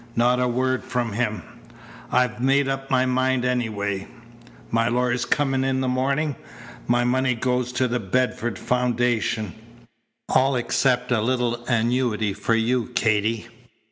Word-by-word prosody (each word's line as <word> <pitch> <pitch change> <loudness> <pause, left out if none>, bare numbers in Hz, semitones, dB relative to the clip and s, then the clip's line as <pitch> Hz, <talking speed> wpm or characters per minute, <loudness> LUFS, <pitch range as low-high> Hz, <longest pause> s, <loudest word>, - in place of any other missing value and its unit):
Not 125 +2 +3
a 125 - +2
word 130 +1 0
from 120 -2 -2
him. 105 -5 -1 0.7
I'd 125 -1 +1
made 135 +1 +3
up 135 0 -3
my 130 0 +3
mind 130 0 +1
anyway. 105 -6 -1 0.6
My 115 0 +2
lawyer's 125 0 0
coming 135 -2 +1
in 135 0 0
the 130 - -1
morning. 135 +3 0 0.5
My 120 0 +3
money 125 +1 +1
goes 125 +1 -1
to 130 0 +1
the 125 0 -1
Bedford 120 +1 -1
Foundation 120 -4 0 0.7
all 135 +1 +3
except 125 +1 +1
a 115 -3 +2
little 120 0 0
annuity 115 -3 +1
for 115 - 0
you, 115 +1 +1
Katy. 110 0 +1
125 Hz, 140 wpm, -23 LUFS, 115-130 Hz, 0.7 s, Not